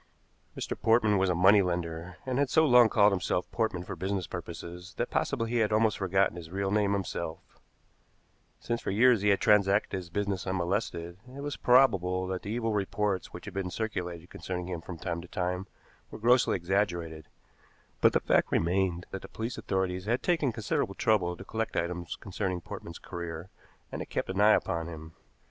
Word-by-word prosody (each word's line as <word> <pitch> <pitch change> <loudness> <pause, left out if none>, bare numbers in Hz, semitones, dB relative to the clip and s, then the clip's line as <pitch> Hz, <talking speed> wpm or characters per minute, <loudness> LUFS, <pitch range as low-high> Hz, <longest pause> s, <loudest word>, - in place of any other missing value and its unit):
Mr. - - -3
Portman 110 -2 +3
was 95 0 +2
a 90 - +2
money 95 +4 +6
lender, 85 -1 -3
and 130 0 -1
had 140 -2 +2
so 160 +3 +4
long 125 -4 +7
called 105 -1 +5
himself 90 -1 0
Portman 110 -6 -1
for - - -6
business 95 -1 -2
purposes 90 +1 -8
that 120 - -2
possibly 115 -5 -1
he 120 - +1
had 110 -2 +2
almost 110 -1 +2
forgotten 95 -1 +1
his 80 -2 -8
real 95 +2 -2
name 105 -1 +2
himself. 85 -4 -5 1.0
Since 120 0 -2
for - - -3
years 115 +2 +4
he 105 - +3
had 100 - +4
transacted 100 -1 +3
his 90 -3 -5
business 100 0 -2
unmolested, 90 -1 -2 0.2
it 140 - -7
was 145 0 -3
probable 95 -8 +3
that 95 0 -3
the 100 - -7
evil 115 0 -1
reports 100 -1 -1
which - - -9
had - - -7
been 95 -1 -2
circulated 90 -5 -4
concerning 90 -1 -5
him 85 -3 -4
from 85 0 -8
time 85 +1 -3
to 90 - -11
time 90 +2 -2 0.4
were - - -8
grossly 120 +3 +4
exaggerated; 85 -4 -1 0.7
but - - +6
the - - +4
fact - - +2
remained 90 0 +1
that 95 - -5
the - - -9
police 115 +2 -5
authorities 95 -1 -2
had 120 +4 0
taken 160 -7 +2
considerable 105 -3 -2
trouble 90 -6 +1
to 95 - -10
collect 110 +2 -3
items 85 0 -2
concerning 95 -2 -3
Portman's 85 0 -8
career, 85 0 -7 0.4
and - - -4
had - - -7
kept - - -2
an 95 +2 0
eye 105 +1 +7
upon 85 0 -2
him. 80 -1 -9
95 Hz, 190 wpm, -29 LUFS, 90-110 Hz, 1.0 s, long